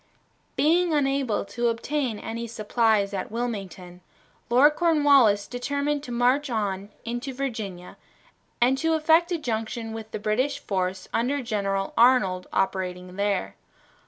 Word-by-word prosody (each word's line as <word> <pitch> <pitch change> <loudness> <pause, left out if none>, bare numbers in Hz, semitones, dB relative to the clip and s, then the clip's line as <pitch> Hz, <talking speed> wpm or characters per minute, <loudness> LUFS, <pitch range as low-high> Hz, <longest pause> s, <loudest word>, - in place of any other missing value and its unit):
Being 325 +4 +3
unable 270 -7 0
to 235 +4 -2
obtain 240 +1 -1
any 230 +2 -5
supplies 220 -2 +1
at 190 - -3
Wilmington, 195 -6 -5 0.5
Lord 270 +5 +6
Cornwallis 285 -11 +4
determined 285 +3 -2
to 255 - -8
march 250 +4 +2
on 200 -4 -2 0.2
into 240 +3 -4
Virginia 215 -9 -5 0.6
and 255 +3 +3
to 325 +1 +1
effect 320 +3 +3
a 345 - +1
junction 225 -3 -4
with 220 -1 -7
the - - -4
British 215 +7 0
force 185 -1 -3
under 260 +4 0
General 195 -4 -2
Arnold 210 -7 +4
operating 180 -1 -2
there. 200 - -1
230 Hz, 130 wpm, -25 LUFS, 200-275 Hz, 0.6 s, Lord